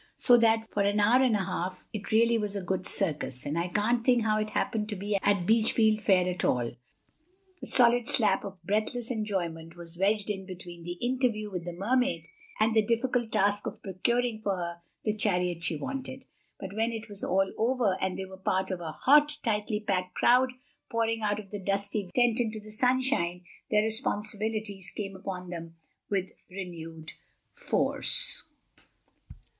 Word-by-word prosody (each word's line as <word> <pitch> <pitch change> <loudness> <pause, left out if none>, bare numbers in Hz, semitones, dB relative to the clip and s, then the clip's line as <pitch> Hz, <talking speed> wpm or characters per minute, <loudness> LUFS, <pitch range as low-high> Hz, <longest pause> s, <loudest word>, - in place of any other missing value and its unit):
So 245 - +6
that 225 -1 +3
for 205 - +1
an 200 +1 +2
hour 230 +5 +5
and 250 -4 +3
a 195 -3 0
half—it 185 +3 -5
really 230 +2 +4
was 210 -2 -1
a 200 - -3
good 185 +1 -2
circus, 150 -10 -2
and 145 +2 -2
I 170 +1 0
can't 220 +5 +1
think 245 -2 +4
how 215 -1 +2
it 215 0 -2
happened 215 0 -1
to 210 - -1
be 205 +2 -2
at 200 -2 +1
Beachfield 220 0 +3
Fair 185 -3 +3
at 180 0 -2
all—a 330 - -5
solid 245 -1 +4
slab 220 -9 +3
of 195 -1 -7
breathless 215 +5 -1
enjoyment 175 -7 -3
was 170 0 -9
wedged 205 +2 +2
in 190 -2 -5
between 175 -2 -9
the 175 +1 -5
interview 240 -1 -1
with 180 -2 -4
the 175 - -4
Mermaid 195 -3 0 0.3
and 220 +1 +3
the 220 - +6
difficult 235 +1 0
task 205 +1 +2
of - - -7
procuring 225 +4 0
for 200 -2 0
her 170 -1 -4 0.3
the 215 - +1
chariot 180 -5 0
she 165 - +1
wanted. 265 - -5 0.3
But 195 -1 -7
when 225 +2 +1
it 225 0 -6
was 205 -2 -6
all 195 0 +1
over 230 -4 +1
and 190 -1 -1
they 190 - -4
were 190 0 -11
part 190 0 0
of 185 - -3
a 160 -2 -5
hot, 295 - +4
tightly 210 -1 0
packed 185 -3 -1
crowd 255 +1 +4 0.4
pouring 225 -1 0
out 205 -1 0
of 200 -2 -11
the 205 - -4
dusty 200 0 -1
tent 240 -2 +3
into 220 -2 -1
the 215 0 -12
sunshine, 250 -7 +1 0.3
their 210 0 +3
responsibilities 215 -3 -2
came 195 -2 -4
upon 185 -1 -6
them 165 -1 -7 0.3
with 190 -2 -1 0.2
renewed 165 -4 -7 0.4
force. - - +2
205 Hz, 175 wpm, -29 LUFS, 185-225 Hz, 0.4 s, So